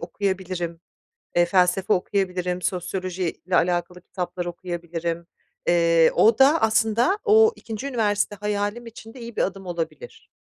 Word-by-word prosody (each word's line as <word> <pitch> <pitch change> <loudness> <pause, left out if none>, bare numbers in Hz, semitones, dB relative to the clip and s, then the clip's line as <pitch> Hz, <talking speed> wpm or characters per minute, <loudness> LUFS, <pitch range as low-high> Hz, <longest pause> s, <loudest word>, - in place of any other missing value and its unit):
okuyabilirim, 185 -4 -3 0.6
eee, 175 0 +5
felsefe 185 +2 +2
okuyabilirim, 180 -1 -1
sosyolojiyle 185 -1 -3
alakalı 175 0 0
kitaplar 180 -1 -5
okuyabilirim. 170 -1 -5 0.4
Eee, 170 -1 +4
o 225 +4 +4
da 290 +5 +5
aslında 220 - +2
o 445 0 +6
2'nci 225 +4 -6
üniversite 210 -5 0
hayalim 205 +3 -2
için 225 0 -11
de 260 - -12
iyi 235 -1 -9
bir - - 0
adım 195 0 -3
olabilir. 175 - -6
185 Hz, 125 wpm, -24 LUFS, 175-220 Hz, 0.6 s, o